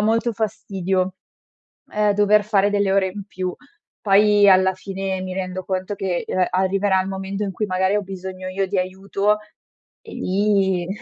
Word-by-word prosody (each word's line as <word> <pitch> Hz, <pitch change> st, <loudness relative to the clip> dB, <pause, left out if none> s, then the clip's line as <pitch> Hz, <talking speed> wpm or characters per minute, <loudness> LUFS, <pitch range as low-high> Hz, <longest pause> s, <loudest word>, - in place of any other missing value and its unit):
molto 225 Hz, +2 st, +1 dB
fastidio, 195 Hz, -4 st, -2 dB, 0.8 s
ehm, 210 Hz, -1 st, +2 dB
dover 210 Hz, +1 st, +4 dB
fare 205 Hz, -1 st, +2 dB
delle 200 Hz, -1 st, +1 dB
ore 195 Hz, -1 st, +3 dB
in 200 Hz, +2 st, -7 dB
più. 185 Hz, -2 st, -4 dB, 0.5 s
Poi 205 Hz, 0 st, +5 dB
alla 190 Hz, 0 st, +5 dB
fine 190 Hz, 0 st, -4 dB
mi 185 Hz, 0 st, -5 dB
rendo 185 Hz, 0 st, -4 dB
conto 190 Hz, +2 st, -3 dB
che, 185 Hz, -3 st, -2 dB
uhm, 185 Hz, -1 st, +1 dB
arriverà 190 Hz, +1 st, +2 dB
il 185 Hz, -, -5 dB
momento 195 Hz, +1 st, -4 dB
in 195 Hz, -, -2 dB
cui 210 Hz, +3 st, -2 dB
magari 190 Hz, +1 st, +1 dB
ho 210 Hz, -, +1 dB
bisogno 185 Hz, -1 st, -7 dB
io 190 Hz, +1 st, -1 dB
di 200 Hz, -, -2 dB
aiuto 195 Hz, +3 st, 0 dB, 0.6 s
e -, -, -12 dB
lì 190 Hz, -2 st, +1 dB
195 Hz, 165 wpm, -21 LUFS, 185-205 Hz, 0.8 s, Poi